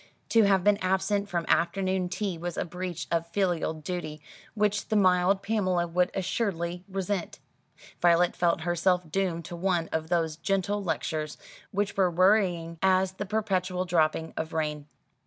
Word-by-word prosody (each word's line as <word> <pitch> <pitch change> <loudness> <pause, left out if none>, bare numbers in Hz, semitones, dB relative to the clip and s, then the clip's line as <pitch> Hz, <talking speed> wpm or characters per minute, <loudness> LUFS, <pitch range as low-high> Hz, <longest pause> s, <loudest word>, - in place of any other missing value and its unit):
To 225 - +5
have 195 -2 +3
been 205 0 +4
absent 200 +2 0
from 170 -2 -1
afternoon 185 +1 +1
tea 190 0 -2
was 175 +1 -5
a - - -1
breach 180 0 -5
of 170 0 0
filial 175 -3 0
duty 155 -1 -5 0.4
which 210 -1 0
the 215 - -1
mild 185 0 +3
Pamela 185 -5 +1
would 180 +2 +1
assuredly 180 -3 -2
resent. 195 -1 -3 0.6
Violet 175 0 +4
felt 170 -2 +1
herself 175 0 +1
doomed 175 -3 -1
to 175 - -7
one 175 -2 0
of 160 0 -2
those 165 -3 0
gentle 195 +2 -1
lectures, 155 -2 -2 0.3
which 200 0 -2
were 190 -2 +4
worrying 175 -2 +2
as 190 0 +3
the 190 +1 -6
perpetual 185 -3 -1
dropping 160 -2 +1
of 160 0 -4
rain. 150 -2 -2
180 Hz, 155 wpm, -28 LUFS, 170-195 Hz, 0.6 s, To